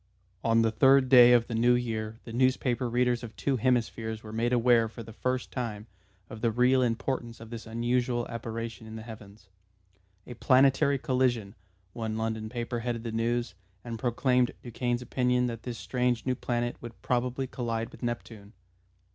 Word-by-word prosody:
On 115 Hz, 0 st, +3 dB
the 115 Hz, -, +2 dB
third 135 Hz, +3 st, +5 dB
day 125 Hz, -2 st, +9 dB
of 120 Hz, -1 st, +5 dB
the 120 Hz, -, -6 dB
new 120 Hz, +2 st, +4 dB
year 110 Hz, -2 st, -3 dB
the 115 Hz, -, -9 dB
newspaper 125 Hz, 0 st, +1 dB
readers 125 Hz, 0 st, +1 dB
of 115 Hz, -3 st, -9 dB
two 135 Hz, -2 st, 0 dB
hemispheres 115 Hz, -2 st, -1 dB
were 110 Hz, 0 st, -9 dB
made 115 Hz, +2 st, 0 dB
aware 120 Hz, -2 st, +4 dB
for 115 Hz, +1 st, -9 dB
the 110 Hz, 0 st, -11 dB
first 125 Hz, +2 st, -2 dB
time 110 Hz, -4 st, -4 dB, 0.4 s
of 110 Hz, -, -10 dB
the 115 Hz, -, +2 dB
real 125 Hz, +3 st, +3 dB
importance 120 Hz, 0 st, -2 dB
of 115 Hz, 0 st, -11 dB
this 115 Hz, -1 st, -7 dB
unusual 120 Hz, +1 st, 0 dB
apparition 115 Hz, -1 st, -6 dB
in 110 Hz, -, -8 dB
the 110 Hz, -, -7 dB
heavens. 105 Hz, -3 st, -12 dB, 0.8 s
"A 125 Hz, -, -8 dB
Planetary 135 Hz, +3 st, +4 dB
Collision," 125 Hz, -6 st, 0 dB, 0.4 s
one 110 Hz, -2 st, -3 dB
London 110 Hz, -1 st, -3 dB
paper 120 Hz, 0 st, -3 dB
headed 115 Hz, -1 st, -3 dB
the 115 Hz, -, -4 dB
news, 120 Hz, +2 st, -1 dB, 0.3 s
and 115 Hz, -2 st, -6 dB
proclaimed 125 Hz, +1 st, +1 dB
Duchaine's 120 Hz, 0 st, -2 dB
opinion 125 Hz, 0 st, +1 dB
that 115 Hz, -2 st, -4 dB
this 120 Hz, -2 st, -6 dB
strange 125 Hz, -1 st, -1 dB
new 130 Hz, -, +1 dB
planet 120 Hz, -1 st, -2 dB
would 120 Hz, -1 st, -10 dB
probably 125 Hz, +1 st, 0 dB
collide 115 Hz, -2 st, -3 dB
with -, -, -14 dB
Neptune. 115 Hz, -3 st, -5 dB
120 Hz, 170 wpm, -28 LUFS, 115-125 Hz, 0.8 s, day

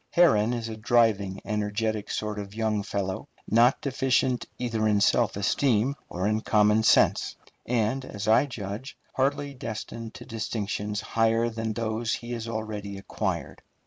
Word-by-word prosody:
Herron 115 Hz, -11 st, +4 dB
is 115 Hz, -2 st, -3 dB
a 110 Hz, -, -5 dB
driving, 110 Hz, -4 st, +2 dB
energetic 105 Hz, 0 st, -1 dB
sort 105 Hz, -1 st, -2 dB
of 100 Hz, 0 st, -7 dB
young 110 Hz, -2 st, 0 dB
fellow, 100 Hz, -2 st, -3 dB, 0.2 s
not 120 Hz, +4 st, +4 dB
deficient 130 Hz, -2 st, +1 dB
either 115 Hz, -3 st, 0 dB
in 105 Hz, -1 st, +3 dB
self 105 Hz, +1 st, +3 dB
esteem 115 Hz, +4 st, +2 dB, 0.2 s
or 90 Hz, +3 st, -1 dB
in 110 Hz, +1 st, +1 dB
common 105 Hz, 0 st, +4 dB
sense, 110 Hz, -, +4 dB, 0.3 s
and, 120 Hz, +2 st, +1 dB
as 105 Hz, -4 st, -6 dB
I 110 Hz, +6 st, +5 dB
judge, 110 Hz, +1 st, -6 dB, 0.2 s
hardly 140 Hz, +1 st, 0 dB
destined 115 Hz, -2 st, -6 dB
to -, -, -9 dB
distinctions 105 Hz, -2 st, -3 dB
higher 115 Hz, +1 st, +2 dB
than 110 Hz, -1 st, -3 dB
those 110 Hz, 0 st, -1 dB
he 120 Hz, 0 st, -8 dB
has 115 Hz, -1 st, -4 dB
already 110 Hz, -3 st, -4 dB
acquired. 95 Hz, -, -3 dB
110 Hz, 145 wpm, -27 LUFS, 105-120 Hz, 0.3 s, I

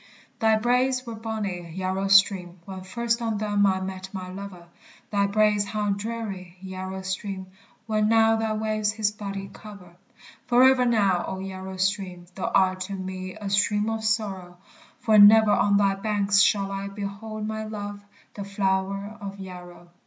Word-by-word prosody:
Thy 220 Hz, -1 st, +4 dB
braes 255 Hz, +3 st, +1 dB
were 230 Hz, -, -6 dB
bonny, 205 Hz, -7 st, -5 dB
Yarrow 190 Hz, +1 st, -1 dB
stream! 195 Hz, -2 st, +4 dB
When 190 Hz, -1 st, -7 dB
first 235 Hz, +5 st, -2 dB
on 225 Hz, -2 st, -1 dB
them 205 Hz, -1 st, +2 dB
I 190 Hz, -1 st, +1 dB
met 190 Hz, 0 st, -6 dB
my 185 Hz, -2 st, -6 dB
lover; 190 Hz, -2 st, -9 dB, 0.5 s
Thy 200 Hz, -1 st, +2 dB
braes 210 Hz, 0 st, +3 dB
how 205 Hz, 0 st, -2 dB
dreary, 200 Hz, -4 st, -5 dB
Yarrow 190 Hz, 0 st, -6 dB
stream! 190 Hz, 0 st, -4 dB, 0.4 s
When 215 Hz, -1 st, +1 dB
now 225 Hz, 0 st, +5 dB
thy 220 Hz, -1 st, -1 dB
waves 215 Hz, -1 st, -1 dB
his 215 Hz, -2 st, 0 dB
body 200 Hz, -2 st, -6 dB
cover. 200 Hz, -5 st, -12 dB, 0.5 s
Forever 255 Hz, +1 st, +5 dB
now, 200 Hz, -6 st, +2 dB
O 190 Hz, -, -4 dB
Yarrow 190 Hz, 0 st, -7 dB
stream! 190 Hz, -2 st, -1 dB
Thou 190 Hz, -, -3 dB
art 185 Hz, -1 st, +3 dB
to -, -, -4 dB
me 185 Hz, 0 st, -6 dB
a 210 Hz, -2 st, -7 dB
stream 210 Hz, +2 st, +2 dB
of 220 Hz, 0 st, -3 dB
sorrow; 195 Hz, -5 st, -2 dB, 0.4 s
For 215 Hz, -2 st, +5 dB
never 215 Hz, +1 st, +8 dB
on 200 Hz, 0 st, +3 dB
thy 200 Hz, -1 st, +3 dB
banks 200 Hz, 0 st, +2 dB
shall 195 Hz, -1 st, +2 dB
I 195 Hz, 0 st, -4 dB
Behold 205 Hz, +2 st, -6 dB
my 220 Hz, 0 st, -3 dB
love, 205 Hz, -1 st, -6 dB, 0.3 s
the 200 Hz, -, -6 dB
flower 195 Hz, +1 st, -2 dB
of 200 Hz, 0 st, -6 dB
Yarrow. 175 Hz, -2 st, -10 dB
200 Hz, 160 wpm, -25 LUFS, 190-215 Hz, 0.5 s, never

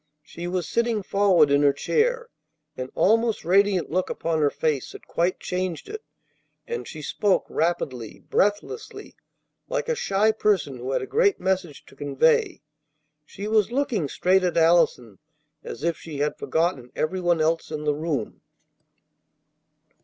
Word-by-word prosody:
She 170 Hz, +3 st, -7 dB
was 180 Hz, -2 st, -2 dB
sitting 230 Hz, -3 st, 0 dB
forward 185 Hz, -7 st, +3 dB
in 140 Hz, 0 st, +4 dB
her 145 Hz, -1 st, +4 dB
chair, 475 Hz, -, 0 dB, 0.5 s
an 130 Hz, 0 st, -5 dB
almost 225 Hz, -2 st, +2 dB
radiant 195 Hz, -1 st, +2 dB
look 185 Hz, +2 st, 0 dB
upon 165 Hz, -1 st, -1 dB
her 145 Hz, -, +4 dB
face 150 Hz, -3 st, -2 dB
that -, -, -12 dB
quite 175 Hz, +2 st, -1 dB
changed 180 Hz, -3 st, -3 dB
it; 430 Hz, +1 st, -6 dB, 0.6 s
and 470 Hz, -1 st, -5 dB
she 155 Hz, -2 st, -8 dB
spoke 200 Hz, +7 st, +1 dB
rapidly, 130 Hz, -9 st, -2 dB
breathlessly, 210 Hz, -, -2 dB, 0.5 s
like -, -, -2 dB
a 480 Hz, -, +1 dB
shy 215 Hz, -, +2 dB
person 195 Hz, -11 st, 0 dB
who 125 Hz, +2 st, -6 dB
had -, -, 0 dB
a -, -, -3 dB
great 425 Hz, -3 st, +2 dB
message 185 Hz, -5 st, -2 dB
to -, -, -18 dB
convey. 145 Hz, +2 st, +1 dB, 0.7 s
She 200 Hz, +2 st, -7 dB
was 215 Hz, -1 st, +2 dB
looking 240 Hz, -, 0 dB
straight 185 Hz, +5 st, +2 dB
at 180 Hz, -1 st, 0 dB
Allison 160 Hz, -, +3 dB, 0.4 s
as -, -, -8 dB
if 170 Hz, -1 st, 0 dB
she 155 Hz, -3 st, -8 dB
had 145 Hz, +1 st, 0 dB
forgotten 160 Hz, -7 st, -1 dB
everyone 175 Hz, +1 st, 0 dB
else 160 Hz, +1 st, 0 dB
in 150 Hz, -1 st, -5 dB
the 150 Hz, -1 st, +1 dB
room. 145 Hz, -6 st, -3 dB
175 Hz, 150 wpm, -24 LUFS, 150-210 Hz, 0.7 s, in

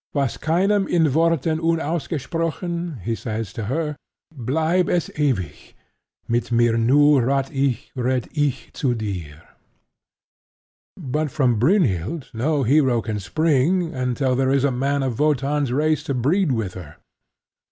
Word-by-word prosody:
"Was 140 Hz, -4 st, 0 dB
Keinem 190 Hz, +5 st, +1 dB
in 170 Hz, -2 st, +3 dB
Worten 160 Hz, 0 st, +1 dB
unausgesprochen," 165 Hz, -, -2 dB
he 115 Hz, -, -1 dB
says 110 Hz, -2 st, -4 dB
to 115 Hz, -, -5 dB
her, 150 Hz, +5 st, -2 dB, 0.4 s
"bleib 160 Hz, +8 st, 0 dB
es 175 Hz, -2 st, 0 dB
ewig: 120 Hz, -, -2 dB, 0.5 s
mit 120 Hz, +1 st, -1 dB
mir 120 Hz, -1 st, +3 dB
nur 140 Hz, +4 st, +4 dB
rath' 135 Hz, +2 st, 0 dB
ich, 135 Hz, -3 st, -1 dB
red' 125 Hz, -1 st, -1 dB
ich 145 Hz, -4 st, -1 dB
zu 125 Hz, -4 st, 0 dB
dir." 90 Hz, -8 st, -6 dB, 1.5 s
But 150 Hz, +3 st, -2 dB
from 125 Hz, -6 st, +1 dB
Brynhild 140 Hz, -, +1 dB
no 140 Hz, +5 st, 0 dB
hero 130 Hz, -3 st, +3 dB
can 110 Hz, -2 st, -3 dB
spring 160 Hz, -, +1 dB
until 130 Hz, 0 st, 0 dB
there 130 Hz, 0 st, +1 dB
is 135 Hz, 0 st, +2 dB
a 140 Hz, -, +2 dB
man 140 Hz, +2 st, 0 dB
of 125 Hz, -4 st, -3 dB
Wotan's 145 Hz, -2 st, +1 dB
race 150 Hz, +2 st, +1 dB
to 140 Hz, -, -2 dB
breed 150 Hz, +7 st, +1 dB
with 110 Hz, -7 st, -2 dB
her. 80 Hz, -6 st, -10 dB
140 Hz, 135 wpm, -22 LUFS, 120-160 Hz, 1.5 s, nur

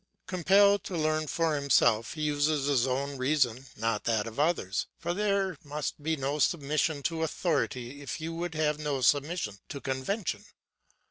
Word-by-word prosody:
Compelled 195 Hz, +2 st, +4 dB
to 180 Hz, -, -3 dB
learn 155 Hz, 0 st, 0 dB
for 165 Hz, +1 st, +1 dB
himself, 120 Hz, -6 st, +3 dB
he 155 Hz, -, -3 dB
uses 145 Hz, -1 st, +1 dB
his 135 Hz, -3 st, +2 dB
own 140 Hz, +2 st, -2 dB
reason 130 Hz, -2 st, +1 dB
not 115 Hz, -1 st, -1 dB
that 110 Hz, -3 st, +1 dB
of 115 Hz, +3 st, -7 dB
others, 150 Hz, -, 0 dB
for 170 Hz, +1 st, -2 dB
there 200 Hz, -1 st, 0 dB
must 150 Hz, 0 st, -4 dB
be 160 Hz, +2 st, 0 dB
no 140 Hz, +1 st, -2 dB
submission 150 Hz, -1 st, +1 dB
to 165 Hz, +1 st, -1 dB
authority 145 Hz, -5 st, -1 dB
if 140 Hz, -, -5 dB
you 160 Hz, +1 st, -4 dB
would 170 Hz, 0 st, -4 dB
have 150 Hz, -1 st, +1 dB
no 145 Hz, -3 st, -2 dB
submission 140 Hz, -, +1 dB
to 140 Hz, -, -5 dB
convention. 130 Hz, -, -2 dB
150 Hz, 160 wpm, -29 LUFS, 135-165 Hz, -, Compelled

